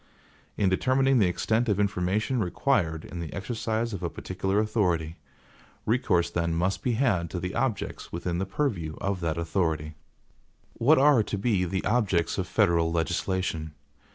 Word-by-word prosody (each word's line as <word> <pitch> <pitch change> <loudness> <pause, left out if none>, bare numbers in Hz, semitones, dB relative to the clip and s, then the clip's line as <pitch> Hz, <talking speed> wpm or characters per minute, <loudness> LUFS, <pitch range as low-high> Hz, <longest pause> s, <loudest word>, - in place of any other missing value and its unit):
In 100 - +2
determining 130 +7 +3
the 100 - +4
extent 110 +6 0
of 105 -1 +1
information 100 +5 0
required 90 - 0
in 85 - -7
the 80 -3 -5
exercise 110 +2 -2
of 95 - -5
a - - -1
particular 95 +2 -3
authority, 90 -7 0 0.7
recourse 90 -8 +1
then 85 -1 0
must 95 +3 0
be 125 - 0
had 110 -9 +1
to 90 - -4
the 90 +2 -4
objects 125 -7 -2
within 85 +1 -3
the 95 - -2
purview 95 - -2
of 100 -2 -1
that 80 -1 -1
authority. 80 -3 -1 0.8
What 150 +7 +4
are 140 -3 +6
to 105 - -3
be 100 -3 +1
the 95 +2 -2
objects 100 -7 +1
of - - -2
federal 85 -1 +2
legislation? 80 -1 -1
95 Hz, 155 wpm, -27 LUFS, 85-110 Hz, 0.8 s, are